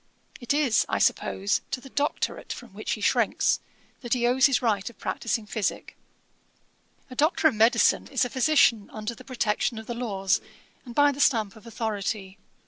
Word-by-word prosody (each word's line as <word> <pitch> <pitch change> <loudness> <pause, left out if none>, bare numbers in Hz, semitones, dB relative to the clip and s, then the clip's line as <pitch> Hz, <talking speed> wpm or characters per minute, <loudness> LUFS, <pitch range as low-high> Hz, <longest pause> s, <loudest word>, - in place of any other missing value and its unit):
It 245 - -3
is, 285 -6 +3
I - - 0
suppose, 200 +2 +1
to 260 - -3
the 270 +1 -14
doctorate, 290 0 -2
from - - -8
which - - -3
he - - -5
shrinks, - - +2 0.4
that 240 -1 -1
he 240 -1 0
owes 255 +3 +5
his 275 - +2
right 210 -5 0
of 235 - -17
practising 225 -1 -2
physick. 210 0 -3 1.2
A - - -8
doctor 310 +3 +3
of 300 - +2
Medicine 225 +2 +3
is 265 -2 +1
a - - -4
physician 255 -6 +3
under 215 +2 -5
the - - -13
protection 235 -2 -1
of 220 - -7
the 240 - -4
laws, 195 -6 0 0.4
and 240 -2 -10
by 290 0 +5
the 280 - -8
stamp 220 -8 +2
of 220 +1 -15
authority. 210 -3 -4
235 Hz, 180 wpm, -26 LUFS, 215-260 Hz, 1.2 s, owes